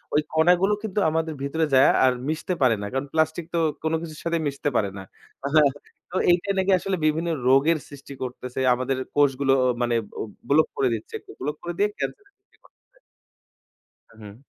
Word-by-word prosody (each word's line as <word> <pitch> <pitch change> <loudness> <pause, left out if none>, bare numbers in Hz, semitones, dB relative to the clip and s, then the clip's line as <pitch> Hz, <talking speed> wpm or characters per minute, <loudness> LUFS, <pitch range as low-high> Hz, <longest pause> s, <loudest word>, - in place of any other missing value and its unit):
ওই 150 - +4
কণাগুলো 175 +5 +4
কিন্তু 210 -1 -2
আমাদের 160 0 -1
ভিতরে 160 +3 0
যায়া, 130 +2 +6
আর 130 - +4 0.2
মিশতে 160 +3 -2
পারে 125 -4 +4
না। - - -4
কারণ 135 +1 -1
প্লাস্টিক 160 +1 0
তো - - +2 0.2
কোন 160 0 0
কিছুর 155 -2 -8
সাথে 170 0 +1
মিশতে 140 +1 -2
পারে 100 -3 +2
না। 95 - -7 1.1
তো - - -7 0.2
এইটা 175 +3 +1
নাকি 190 +1 +2
আসলে 190 +1 -2
বিভিন্ন 160 +2 +1 0.2
রোগের 140 +5 +4
সৃষ্টি 140 0 -11
করতেছে। 125 0 -6
আমাদের 130 +2 -1 0.2
কোষগুলো 140 -1 +3 0.3
মানে 120 -1 +1 0.2
ব - - -5 0.3
ব্লক 155 +3 +4
করে 135 - +2
দিচ্ছে। 110 -1 -6 0.3
ব্লক 150 +3 -2
করে 175 0 -4
দিয়ে 205 +1 +2
ক্যান্সার 410 - -4
সৃষ্টি 395 - -34
করতেছে। - - -28 1.2
হুম। 105 -2 -11
155 Hz, 170 wpm, -24 LUFS, 135-170 Hz, 1.2 s, যায়া